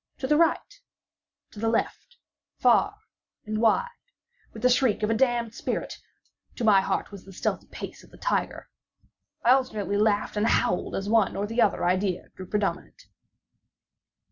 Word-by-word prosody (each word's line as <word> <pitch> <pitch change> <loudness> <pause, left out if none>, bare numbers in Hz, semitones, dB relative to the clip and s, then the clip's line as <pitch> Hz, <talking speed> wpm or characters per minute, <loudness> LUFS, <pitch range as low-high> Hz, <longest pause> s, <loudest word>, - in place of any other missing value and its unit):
To - - -4
the 300 - +3
right—to 330 - -4
the 225 +1 0
left—far 475 - -1 0.5
and 215 +1 -2
wide—with 475 - -3
the 250 - +5
shriek 245 -4 +2
of 210 - +1
a - - +3
damned 235 -1 +1
spirit! - - -4 0.6
to 245 - -5
my 205 -3 +5
heart 190 +1 -2
with 200 -2 -10
the 195 - -12
stealthy 185 - -3
pace - - -9
of - - -18
the - - -16
tiger! - - -2 0.8
I 240 - +5
alternately 215 -6 +1
laughed 210 0 +1
and 210 +2 +2
howled 180 - +1
as 195 - -3
the 205 - -3
one 225 -3 +3
or 200 - -1
the 230 +3 -1
other 205 - +2
idea 185 +1 0
grew 185 - -11
predominant. 210 - -3
220 Hz, 155 wpm, -26 LUFS, 205-250 Hz, 0.8 s, the